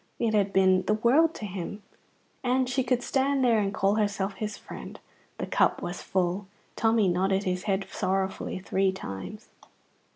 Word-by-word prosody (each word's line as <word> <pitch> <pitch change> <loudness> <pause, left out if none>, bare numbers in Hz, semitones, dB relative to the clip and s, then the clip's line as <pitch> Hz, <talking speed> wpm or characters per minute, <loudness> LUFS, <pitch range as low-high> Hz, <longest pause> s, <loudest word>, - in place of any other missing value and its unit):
It 225 -2 0
had 200 -2 +2
been 190 -1 +4
the 215 - +3
world 280 +9 +3
to 215 - -6
him. 200 +1 -6 0.6
And 255 0 +2
she 255 +1 0
could 245 0 0
stand 275 0 +1
there 230 -3 +4
and 200 -1 0
call 200 0 +1
herself 200 -2 0
his 210 +1 -5
friend. - - -9 0.4
The - - -3
cup - - +1
was - - -4
full. 185 +1 -1 0.3
Tommy 225 -2 +3
nodded 190 +2 +1
his 180 -1 -2
head 195 0 +1
sorrowfully 190 -1 -1
three 190 +1 +1
times. 95 - -7
200 Hz, 165 wpm, -27 LUFS, 190-230 Hz, 0.6 s, been